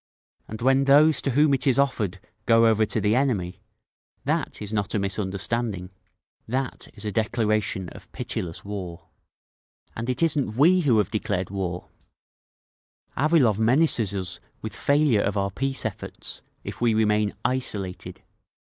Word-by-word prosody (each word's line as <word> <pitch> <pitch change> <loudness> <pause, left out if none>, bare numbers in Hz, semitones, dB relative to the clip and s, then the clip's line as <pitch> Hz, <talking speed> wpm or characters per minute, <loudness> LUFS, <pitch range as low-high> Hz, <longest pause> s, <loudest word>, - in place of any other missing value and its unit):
'—and 110 +2 -7
when 135 +1 +4
those 145 +2 +5
to - - -1
whom 145 +2 +3
it 135 +2 +1
is 130 - +4
offered 115 -10 0 0.3
go 115 0 +5
over 110 -1 +3
to 110 - 0
the 105 +2 +2
enemy, 115 -10 -1 0.6
that - - -1
is 105 0 -6
not 105 +1 -1
a - - +2
misunderstanding…. 100 0 -2 0.6
that 130 +2 -3
is 105 0 -7
a 105 - -2
declaration 105 -3 0
of - - -14
pitiless 85 0 -5
war. 95 -4 -7 0.9
And 115 +2 -4
it 125 +5 0
isn't 140 -9 0
we 175 +7 +5
who 135 -10 +3
have 105 -4 +1
declared 95 -4 -2
war…. 90 -3 -4 1.3
"Avilov 135 -8 +3
menaces 115 - +2
us 90 -2 -3 0.2
with - - -7
failure 140 -7 +3
of 100 +1 -1
our 100 0 0
peace 135 +5 -2
efforts—if 110 +2 -6
we 115 -2 +3
remain 105 -1 +2
'isolated. 105 -7 -3
110 Hz, 145 wpm, -25 LUFS, 100-130 Hz, 1.3 s, those